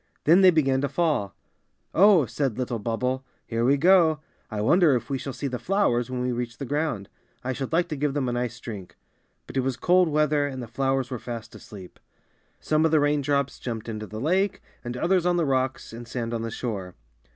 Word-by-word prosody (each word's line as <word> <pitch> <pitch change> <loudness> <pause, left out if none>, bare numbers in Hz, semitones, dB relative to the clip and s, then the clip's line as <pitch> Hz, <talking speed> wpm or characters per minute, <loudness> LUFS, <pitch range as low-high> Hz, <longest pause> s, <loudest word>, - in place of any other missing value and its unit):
Then 170 +5 +6
they 190 - +8
began 135 -6 +2
to 140 - -1
fall. 150 - 0 0.9
said 130 -2 -2
little 125 -2 -2
Bubble, 125 +4 -2 0.3
^Tere 115 0 0
we 135 +4 +4
go. 165 -1 +5 0.3
I 110 - -4
wonder 155 - +4
if 120 +3 -4
we 135 - -1
shall 135 - -5
see 130 +2 -6
the 125 -3 -2
flowers 125 - +1
when 125 -1 -3
we 125 - 0
reach 120 -1 -4
the 140 - -5
ground. 145 -8 -2 0.4
I 130 - -2
should 135 0 -5
like 170 +2 +2
to 155 - -3
give 145 0 -1
them 140 -3 0
a - - 0
nice 120 -1 -3
drink.^^ 100 -6 -8 0.5
But - - -7
it - - +4
was 130 -1 -1
cold 180 +5 +3
weather 150 -1 +2
and 130 -2 -6
the 120 - -6
flowers 135 +1 -1
were 125 - -3
fast 115 -2 -7
asleep. 95 -4 -12 0.6
Some 155 0 +1
of 160 - +4
the 155 -1 +4
rain 145 0 +2
drops 140 0 -1
jumped 115 -3 -5
into 110 -1 -5
the 110 - -7
lake 185 - 0 0.2
and 120 +1 -5
others 180 +4 +2
on 175 0 +2
the 170 - +1
rocks 130 -3 -1
and 115 +1 -9
sand 115 -1 -4
on 115 - -2
the 115 - -3
shore. 100 -6 -5
130 Hz, 220 wpm, -25 LUFS, 120-150 Hz, 0.9 s, they